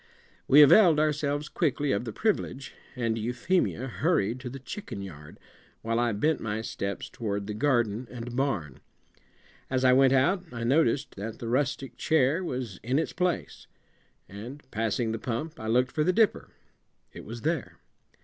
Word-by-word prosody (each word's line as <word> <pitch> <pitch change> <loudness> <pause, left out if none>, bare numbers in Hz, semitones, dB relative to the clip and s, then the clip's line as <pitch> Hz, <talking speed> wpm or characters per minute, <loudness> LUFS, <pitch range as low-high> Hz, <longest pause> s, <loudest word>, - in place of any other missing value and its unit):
We 145 +2 +9
availed 165 +1 +7
ourselves 150 -1 0
quickly 145 -3 0
of 100 +2 0
the 115 - -4
privilege, 140 - -2 0.2
and 115 -3 0
Euphemia 125 +5 0
hurried 130 - 0
to 130 -1 -6
the 135 - -7
chicken 135 - -7
yard, 75 -6 -11 0.4
while 115 +1 0
I 120 -1 +2
bent 150 +10 +1
my 110 0 -3
steps 100 -3 -4
toward 100 -4 -4
the 105 - -4
garden 120 -2 +1
and 120 -1 -7
barn. 105 - -1 0.9
As 130 0 +1
I 125 - +6
went 135 0 +5
out 175 +8 +3
I 115 -1 -5
noticed 140 +2 +2
that 110 +3 -5
the 115 - -6
rustic 135 +1 -1
chair 160 +3 +2
was 125 - -4
in 125 +5 0
its 160 - -1
place, 180 -1 -2 0.6
and 120 +9 -9
passing 115 +1 -1
the 115 - -3
pump 150 +9 -4
I 110 - -5
looked 125 +3 +2
for 155 - 0
the 180 - +3
dipper. 220 +2 +2 0.6
It - - -9
was 115 +1 -8
there. 160 -4 -2
125 Hz, 165 wpm, -28 LUFS, 115-150 Hz, 0.9 s, We